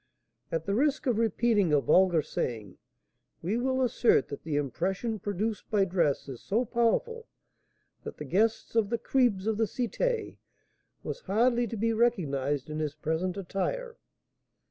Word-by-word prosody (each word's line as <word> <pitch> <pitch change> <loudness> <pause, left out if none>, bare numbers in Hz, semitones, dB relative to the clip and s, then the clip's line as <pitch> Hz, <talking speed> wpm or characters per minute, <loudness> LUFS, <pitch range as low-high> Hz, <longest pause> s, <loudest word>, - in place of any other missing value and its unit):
At 165 -1 -2
the 200 - -1
risk 285 +7 +1
of 240 -4 +1
repeating 225 -4 +2
a 150 - +5
vulgar 175 +1 +4
saying, 110 -9 -4 0.6
we 190 +6 0
will 260 +1 +1
assert 240 - +3
that 140 - -6
the 155 -2 -3
impression 190 - -1
produced 205 +3 -3
by 205 -3 +3
dress 170 -8 0
is 130 -4 -8
so 230 +5 0
powerful, 450 - 0 0.8
that - - -7
the - - -6
guest 225 +3 0
of 220 -3 +2
the 235 - 0
"cribs" 235 -7 +1
of 220 -1 0
the 225 - +2
Cité 430 - -2 0.7
was - - -5
hardly 240 - +2
to 225 - -5
be 230 +2 +1
recognised 145 - 0
in 155 0 -4
his 150 -1 -2
present 160 +5 -2
attire. 460 - -3
210 Hz, 155 wpm, -29 LUFS, 165-240 Hz, 0.8 s, a